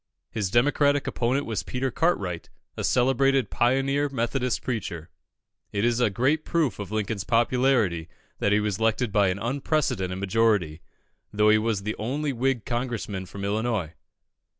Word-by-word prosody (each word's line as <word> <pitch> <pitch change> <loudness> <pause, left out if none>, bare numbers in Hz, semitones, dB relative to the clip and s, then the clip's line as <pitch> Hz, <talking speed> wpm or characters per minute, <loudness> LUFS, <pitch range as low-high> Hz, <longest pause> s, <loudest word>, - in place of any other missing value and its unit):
His 105 -4 -2
Democratic 145 +4 +3
opponent 130 +4 0
was 110 -5 -2
Peter 125 +9 -3
Cartwright, 100 - -1 0.3
a - - -4
celebrated 135 -1 +2
pioneer 135 +4 +1
Methodist 125 0 -1
preacher. 90 -9 -4 0.6
It 100 +2 0
is 120 0 +2
a 120 -3 +3
great 135 +10 +1
proof 160 -10 0
of 100 -1 -6
Lincoln's 110 -2 -2
popularity 115 -8 +2 0.3
that 100 - +1
he 105 - +4
was 105 -2 -2
elected 115 +1 +1
by 100 -1 +3
an 90 +1 0
unprecedented 120 - -1
majority, 100 -5 +1 0.5
though 105 +1 +3
he 110 0 +5
was 110 -3 -1
the 105 +1 -2
only 140 +6 -2
Whig 125 -1 0
Congressman 115 -6 -3
from 100 +2 -6
Illinois. 105 -5 -1
115 Hz, 150 wpm, -26 LUFS, 100-130 Hz, 0.6 s, he